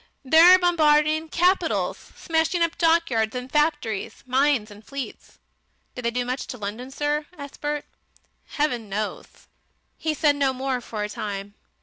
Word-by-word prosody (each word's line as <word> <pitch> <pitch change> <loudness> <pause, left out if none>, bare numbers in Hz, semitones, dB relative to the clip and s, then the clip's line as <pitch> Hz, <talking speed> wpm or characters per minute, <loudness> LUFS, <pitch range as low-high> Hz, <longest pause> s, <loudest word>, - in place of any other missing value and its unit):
They're 330 +6 +8
bombarding 315 -3 +3
capitals, 360 +4 0
smashing 325 +1 0
up 335 -1 -1
dockyards 325 -10 +2
and 250 +1 -5
factories, 295 -9 -1
mines 255 -4 +1
and 205 +1 -13
fleets." 275 +1 -8 0.6
"Did 250 - -7
they - - +3
do 245 +1 -2
much 255 +2 -3
to 250 - -6
London, 220 +4 -6
sir?" 295 +2 -2
asked 285 -1 -10
Bert. 295 0 -2 0.6
"Heaven 245 -8 -2
knows...." 210 +2 -5 0.5
He 315 -1 -1
said 295 -1 +3
no 275 -2 +2
more 260 -1 -2
for 215 -2 -5
a - - -2
time. 205 -1 -5
280 Hz, 145 wpm, -24 LUFS, 235-315 Hz, 0.6 s, They're